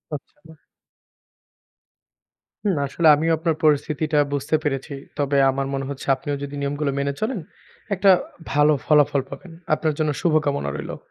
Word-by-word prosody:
আচ্ছা। 160 +3 -13 2.1
হুম, 200 -4 +1
আসলে 160 +4 +1
আমিও 160 +3 0
আপনার 160 0 0
পরিস্থিতিটা 155 0 +1 0.2
বুঝতে 145 +2 0
পেরেছি। 140 -1 -2 0.2
তবে 140 -1 +1
আমার 135 +1 -2
মনে 135 0 -2
হচ্ছে 140 -2 -7
আপনিও 145 +2 -4
যদি 140 0 -6
নিয়মগুলো 140 +1 -1
মেনে 140 0 -1
চলেন 220 0 -1 0.5
একটা 195 +1 +3 0.4
ভালো 150 +1 +4
ফলাফল 145 -2 +4
পাবেন। 180 +4 -10 0.2
আপনার 155 0 0
জন্য 155 -1 +1
শুভকামনা 150 - +1
রইলো। 75 - -6
150 Hz, 135 wpm, -22 LUFS, 140-160 Hz, 2.1 s, ভালো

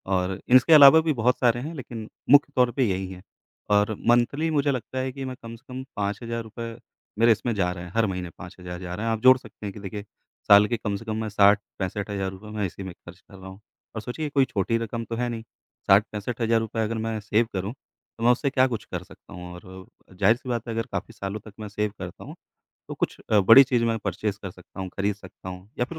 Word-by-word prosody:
और 95 +1 -1 0.2
इसके 145 +6 +6
अलावा 145 +1 +10
भी 160 -1 0
बहुत 125 0 +1
सारे 120 -1 +3
हैं, 155 +6 -5
लेकिन 115 -5 -7 0.2
मुख्य 145 +1 +6
तौर 125 -1 +3
पे 130 - 0
यही 95 0 -2
हैं, 90 0 -10 0.5
और 105 +1 +3
मंथली 120 +7 +3
मुझे 145 -1 +2
लगता 130 +1 -4
है 130 0 -2
कि 135 0 -6
मैं 130 -1 -5
कम 115 0 -8
से 115 - -19
कम 130 +1 -5
₹5000 115 +2 -4 0.4
मेरे 115 0 +6
इसमें 115 +2 0
जा 90 -3 +1
रहे 90 -1 -7
हैं, 90 - -10
हर 115 -1 +3
महीने 90 -2 -4
5000 90 0 -9
जा 90 -1 -6
रहे 110 - -4
हैं। 115 - +1
आप 110 - -2
जोड़ 130 0 +7
सकते 110 - -12
हैं 100 - -4
कि 105 - -10
देखिए, 100 +1 -6 0.4
साल 105 +1 +8
के 120 - -1
कम 105 -2 -3
से 115 - -8
कम 110 0 -3
मैं 110 - -3
60 100 0 +5 0.2
₹65000 95 +1 -4
मैं 105 - 0
इसी 95 +1 -6
में 95 -2 -7
खर्च 85 +1 -15
कर 100 - -18
रहा 95 - -11
हूँ, 95 +2 -12 0.4
और 110 - -3
सोचिए 125 +8 -5
ये 150 - -3
कोई 140 -2 +3
छोटी 115 +2 -1
रकम 115 0 -4
तो 115 - -5
है 120 +1 -1
नहीं, 115 -1 -5 0.4
60 100 +2 +6
₹65000 115 +1 -1
अगर 115 +1 -2
मैं 110 -1 -2
सेव 105 +2 +1
करूँ, 95 +4 -3
तो 115 -3 -15
मैं 120 - +6
उससे 135 +3 +1
क्या 130 -1 +3
कुछ 115 -4 -4
कर 90 -1 -4
सकता 95 +2 -16
हूँ? 90 0 -8
और 95 +1 -12 0.3
ज़ाहिर-सी 110 +7 +2
बात 120 -1 -2
है, 115 - -3
अगर 115 0 -2
काफ़ी 100 +4 -4
सालों 100 -1 -5
तक 110 - -12
मैं 105 - -6
सेव 105 +1 -2
करता 90 -1 -8
हूँ, - - -10 0.5
तो - - -5
कुछ - - -2
अ, 105 -2 +5
बड़ी 115 +8 +9
चीज़ 120 -2 +1
मैं 115 -1 0
परचेज़ 100 +1 -3
कर 95 - -5
सकता 90 +2 -12
हूँ, 95 - -4
खरीद 100 0 0
सकता 95 -2 -12
हूँ, 90 +2 -9
या 120 - +2
फिर 160 +4 -9
110 Hz, 245 wpm, -25 LUFS, 95-120 Hz, 0.5 s, अलावा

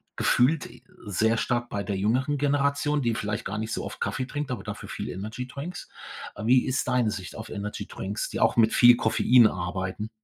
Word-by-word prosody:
gefühlt, 135 +4 +2
äh, 120 +1 -16 0.2
sehr 110 +3 +1
stark 120 0 -1
bei 100 -1 -3
der 95 +1 -3
jüngeren 130 +9 +1
Generation, 145 +1 +1
die 120 -3 +1
vielleicht 110 0 -3
gar 105 - -3
nicht 110 +1 -3
so - - -3
oft - - -7
Kaffee 130 - -1
trinkt, 145 +1 -4
aber 115 -6 -4
dafür - - -7
viel - - -5
Energydrinks. 125 - -6 0.5
Wie 125 +3 +4
ist 130 -1 -1
deine 125 -4 +2
Sicht 95 -3 -6
auf 110 - -8
Energydrinks, 100 -1 -5
die - - -4
auch - - +3
mit 110 -1 +5
viel 120 0 +8
Koffein 115 +1 +5
arbeiten? 95 +4 -4
115 Hz, 190 wpm, -26 LUFS, 105-130 Hz, 0.5 s, viel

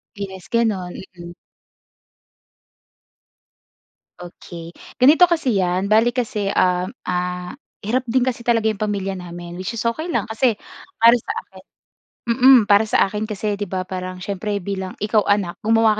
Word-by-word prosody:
Yes, 190 -4 -7
gano'n. 210 -6 0 0.2
Mm. 175 0 -9 2.9
Okey. 170 -1 -10 0.2
Ganito 310 +7 +6
kasi 320 -8 +1
'yan. 180 +1 0
Bale 225 +2 +5
kasi, 235 -5 -2
um, 180 -1 +1 0.2
ah, 180 0 -3 0.3
hirap 245 +5 +1
din 250 +1 +2
kasi 250 -2 -2
talaga 230 -2 +1
'yong 215 -2 0
pamilya 200 -2 -1
namin. 175 -1 -8
Which 230 +5 -4
is 225 - -4
okey 310 +9 -1
lang - - 0
kasi 225 0 0 0.4
para 230 +1 +7
sa 425 - -5
akin - - -16 0.6
mm. 250 +2 +6
Para 205 +2 +4
sa - - +3
akin 210 +2 -4
kasi 210 0 -2
'di 205 -1 -4
ba 185 0 -3
parang 185 0 -5
siyempre 200 +2 -3
bilang 190 -1 -5
ikaw 210 +1 +2
anak, 200 -4 0
gumawa 225 0 +4
205 Hz, 145 wpm, -21 LUFS, 185-230 Hz, 2.9 s, para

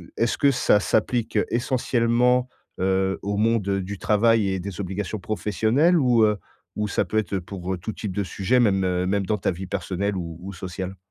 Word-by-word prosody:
est-ce 115 0 0
que 140 -1 +4
ça 120 -5 +3
s'applique 115 +3 0
essentiellement, 125 0 +1 0.3
heu, 95 0 +1
au 100 0 -1
monde 105 -3 +1
du 95 +1 -5
travail 110 0 +3
et 95 -1 -1
des 100 0 -6
obligations 100 +2 -3
professionnelles 110 - +1
ou 120 -6 +4
heu, 105 -1 +3 0.4
ou 105 0 -1
ça - - 0
peut 110 - -2
être 100 -2 0
pour 95 0 -5
tout 110 +5 -5
type 100 -4 -5
de 100 - 0
sujet 100 +7 +1
même 95 -5 +2
même 95 +1 0
dans 105 +1 0
ta - - 0
vie 95 +2 -6
personnelle 100 +1 -2
ou 85 -2 -5
ou 100 +1 -7
sociale? 95 +1 -6
100 Hz, 185 wpm, -24 LUFS, 95-115 Hz, 0.4 s, que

